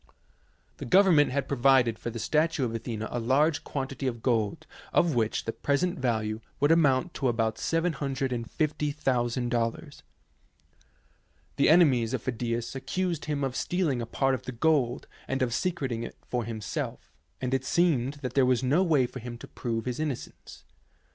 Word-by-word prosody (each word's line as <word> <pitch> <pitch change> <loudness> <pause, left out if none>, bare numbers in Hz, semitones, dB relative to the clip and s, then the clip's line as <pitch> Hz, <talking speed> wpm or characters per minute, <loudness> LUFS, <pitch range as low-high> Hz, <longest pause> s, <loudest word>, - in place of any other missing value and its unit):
The - - -6
government 175 -1 +5
had 140 0 -1
provided 130 -3 +3
for - - -4
the 115 - -6
statue 150 +4 +1
of 115 - -3
Athena 115 -1 -4
a 120 - -2
large 140 +6 +2
quantity 135 -1 -4
of 120 -3 -4
gold 110 -5 0 0.3
of 170 -3 +3
which 115 -3 0
the 115 - -2
present 160 +5 0
value 110 -3 -1 0.2
would 145 +2 +3
amount 160 0 +3
to 135 - -1
about 115 -2 0
$750,000. 135 -5 -1 1.6
The 140 - +4
enemies 130 -8 +4
of 125 - -5
Phi 130 - -1
dias 120 0 -3
accused 170 +5 -2
him 145 -2 -2
of 130 -2 -2
stealing 165 -9 0
a 115 - -4
part 135 +3 +1
of 130 - -2
the 130 - -4
gold 125 -1 +1 0.2
and 135 0 0
of 120 -2 -1
secreting 135 -7 -1
it 115 - -7
for 120 -2 -2
himself, 110 -2 -5 0.3
and 130 0 -2
it 135 - +1
seemed 150 -6 +1
that 125 -1 -3
there 135 - +4
was 125 0 +2
no 140 +8 +3
way 155 -8 +3
for 130 - -7
him 120 0 -7
to - - -10
prove 115 -2 -4
his 125 +1 -3
innocence. 150 -5 -6
130 Hz, 165 wpm, -28 LUFS, 120-150 Hz, 1.6 s, government